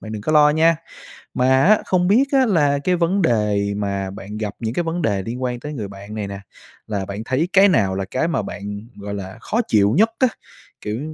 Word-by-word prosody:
bạn 110 - -8
đừng 105 - -5
có 155 - -1
lo 150 -1 +6
nha. 160 +2 +3 0.6
Mà, 130 +1 +3
á, 210 +3 +6
không 180 -1 +1
biết, 240 +7 +5
á, 265 -2 +4
là 145 -8 +2
cái 180 -1 +2
vấn 180 +3 +1
đề 105 -6 +1
mà 100 -2 -2
bạn 105 +2 -8
gặp 105 -2 -4
những 115 +1 -3
cái 175 - 0
vấn 165 +1 -3
đề 100 -5 0
liên 120 +6 -6
quan 125 -1 -2
tới 150 - -6
người 110 -9 -5
bạn 100 +2 -10
này 105 -2 -3
nè, 100 0 -7 0.5
là 100 -3 -3
bạn 100 +3 -6
thấy 140 +8 0
cái 195 +1 +6
nào 100 - +2
là 95 0 -2
cái 130 - -1
mà 165 - -1
bạn, 100 0 -6 0.2
gọi 100 0 -6
là, 100 +2 -7
khó 225 - -1
chịu 105 0 +3
nhất 225 +1 +5
á? 260 - +5 0.5
Kiểu, 105 +2 -4
115 Hz, 235 wpm, -20 LUFS, 100-165 Hz, 0.6 s, lo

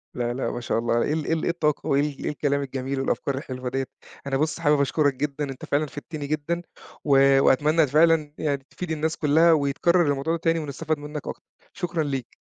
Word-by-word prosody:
لا، 120 -1 -1
لأ 130 - -2
ما 120 - -5
شاء 115 - 0
الله، 115 0 +1
إيه 145 - 0
ال 155 -1 -2
إيه - - 0
ال 160 - -1
إيه - - 0
الطاقة 155 -3 0
وإيه 140 0 +3 0.2
ال - - -4
الكلام 145 -1 0
الجميل 135 0 -3
والأفكار 135 +1 -1
الحلوة 130 -2 -5
دِيّة، 135 +1 -2 0.4
أنا 135 -1 0
بُص، 155 +3 -1
حابب 150 -3 +3
أشكرك 145 0 +2
جدًا، 145 +2 -3
أنت 135 -1 -7
فعلًا 145 +2 +1
فِدتني 145 0 -7
جدًا 155 +3 -2 0.4
و 135 -1 +5
وأتمنى 150 +4 +4
فعلًا 155 +1 +3
يعني 140 -3 -1
تفيد 180 -3 -6
الناس 160 +1 -1
كلّها 160 +3 +4
ويتكرّر 160 +4 +2
الموضوع 140 +4 -1
ده 170 - -2
تاني، 165 0 +1
ونستفاد 155 +1 -3
منك 150 0 -7
أكتر. - - -6 0.3
شكرًا 175 -3 -2
ليك. 135 -4 -4
145 Hz, 205 wpm, -24 LUFS, 135-160 Hz, 0.4 s, و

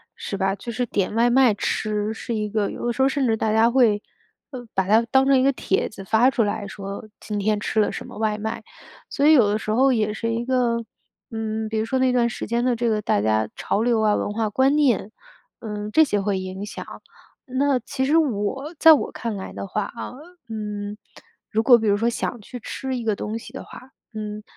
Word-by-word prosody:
是 - - -5
吧。 195 0 +1
就 230 +4 -7
是 245 +2 -1
点 205 -2 -1
外 235 +1 +4
卖 250 -3 +5
吃 210 +1 -1
是 230 +1 -5
一 210 -1 -2
个 210 -1 0
有 - - -6
的 240 - +1
时 245 +3 -2
候 265 - +5
甚 275 0 0
至 225 -1 +1
大 215 0 0
家 225 +2 +4
会， 225 -5 +3 0.5
呃， 245 -3 -8
把 190 - +1
它 215 +4 +5
当 265 0 +4
成 270 -1 +5
一 - - +2
个 275 0 +3
帖 190 - 0
子 195 -3 -10
发 220 +6 +4
出 240 -4 +1
来 205 0 -2
说 200 +1 -7
今 210 -1 -4
天 210 +1 +1
吃 220 - -1
了 210 - +3
什 - - -6
么 - - -11
外 215 -1 0
卖。 220 +2 -4 0.5
所 280 - 0
以 310 - +7
有 245 -8 +6
的 205 +1 +1
时 215 - -4
候 260 +3 +4
也 215 -2 0
是 230 +1 -3
一 230 +1 -2
个 240 -2 +1 0.5
嗯， 220 0 -3
比 220 0 -1
如 220 - 0
说 260 +4 -1
那 260 0 +3
段 240 -1 +2
时 - - -5
间 235 +2 0
的 250 - +2
这 235 0 0
个 215 -1 0
大 100 - +1
家 110 0 +1
潮 210 - -1
流 235 -2 +2
啊， 210 -1 +3
文 205 - -2
化 220 0 -1
观 265 +6 +2
念， 255 -8 +2 0.5
嗯， 210 -2 -5
这 315 - +7
些 210 -9 0
会 195 -1 0
影 185 +2 -5
响。 - - -7 0.7
那 270 0 +2
其 265 +3 -3
实 295 +4 +2
我 270 +2 -1
在 320 +1 +8
我 290 - 0
看 230 -3 -4
来 190 - -6
的 - - -5
话， 200 +2 -2
啊， - - -6 0.4
嗯， 210 -1 -5 0.5
如 220 +1 0
果 240 -1 +7
比 220 - -1
如 200 - +3
说 230 +3 0
想 240 0 -2
去 245 +4 -9
吃 265 +3 -4
一 240 - -4
个 220 -2 0
东 220 +3 -4
西 - - -12
的 - - -7
话， 255 - -13 0.2
嗯， 210 -1 -6
220 Hz, 255 characters per minute, -23 LUFS, 210-250 Hz, 0.7 s, 在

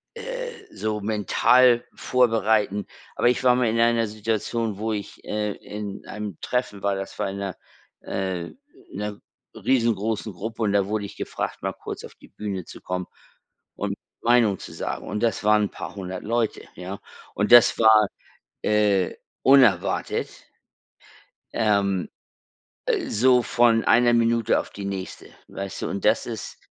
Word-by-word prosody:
äh, - - -5 0.2
so 105 +1 -2
mental 115 +4 +4
vorbereiten. 110 -4 +2 0.3
Aber 120 - +3
ich 125 - 0
war 125 -1 +5
mal 125 -1 +2
in 115 +1 0
einer 115 -1 +3
Situation, 110 0 -2
wo 110 +2 -2
ich, 105 -1 -6
äh 105 0 -1
in 105 -1 -7
einem 105 -4 -6
Treffen 125 -5 -2
war, 100 -1 +1
das 95 0 -6
war - - 0
in 100 - -6
'ner 100 -2 -4 0.5
äh, 95 -3 -3 0.4
in - - -8
'ner 105 0 -4 0.4
riesengroßen 115 -3 0
Gruppe 110 +5 -5
und 100 -2 +1
da 100 -1 +3
wurde 105 -1 -2
ich 100 - -10
gefragt, - - -4
mal - - -1
kurz - - -8
auf - - -11
die - - -18
Bühne 100 -4 -5
zu - - -12
kommen 90 0 -3 0.7
und - - -3 0.3
Meinung 115 -5 +3
zu - - -9
sagen. - - -4
Und 105 - -3
das 115 -2 0
waren 105 0 +4
'n - - -5
paar - - -7
100 95 -2 -6
Leute, 115 0 -1
ja? 95 +2 -7 0.4
Und 105 +2 0
das 120 -1 +8
war, 110 -2 +6 0.6
äh, 105 -3 +2 0.3
unerwartet 125 -9 +4 1.2
ähm, 100 -4 +1 0.8
äh, - - 0
so 125 +2 +4
von 115 -2 +3
einer 120 0 +5
Minute 115 -1 +3
auf - - -7
die 100 - -7
nächste, 95 -1 -6 0.2
weißt 100 0 -6
du? - - -2
Und 100 - -4
das 110 +1 +3
ist 115 -3 -6
105 Hz, 155 wpm, -24 LUFS, 100-115 Hz, 1.2 s, das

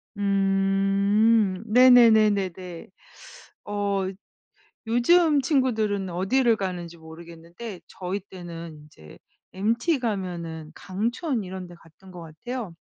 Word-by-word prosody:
음. 195 +1 +2
네네네네네. 215 -7 +4 0.8
어 200 -2 -1 0.8
요즘 295 +6 +4
친구들은 220 - 0
어디를 225 +7 +2
가는지 175 -3 -5
모르겠는데 170 +5 -11
저희 190 +2 -5
때는 170 -3 -9
인제 80 - -16 0.4
MT 235 - 0
가면은 175 -8 -4
강촌 230 - -3
이런 185 0 -7
데 175 - -13
갔던 170 +3 -19
것 180 -1 -10
같아요. 180 +5 -7
195 Hz, 215 characters per minute, -25 LUFS, 175-225 Hz, 0.8 s, 네네네네네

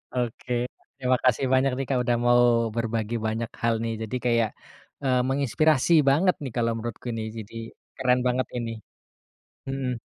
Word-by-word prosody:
Oke, 125 0 -3 0.5
terima 130 0 +2
kasih 130 +1 +3
banyak 130 +1 +3
nih, 135 - -2
Kak, 130 -2 +2
udah 120 0 +1
mau 120 0 +5 0.4
berbagi 115 -1 -1
banyak 115 +1 -2 0.2
hal 115 0 +3
nih, 115 0 -1
jadi 110 +3 -4
kayak, 115 -3 +3 0.5
eee, 130 -2 +3
menginspirasi 140 +3 +2 0.2
banget 180 +7 +3
nih, 130 - -4
kalau 115 -1 +2
menurutku 115 +1 -6
ini 110 - -3
jadi 110 +1 -8 0.4
keren 125 -1 +2
banget 125 +1 0
ini. 115 -1 -3 1.0
Mhm. 130 -3 -2
125 Hz, 155 wpm, -26 LUFS, 115-130 Hz, 1.0 s, mau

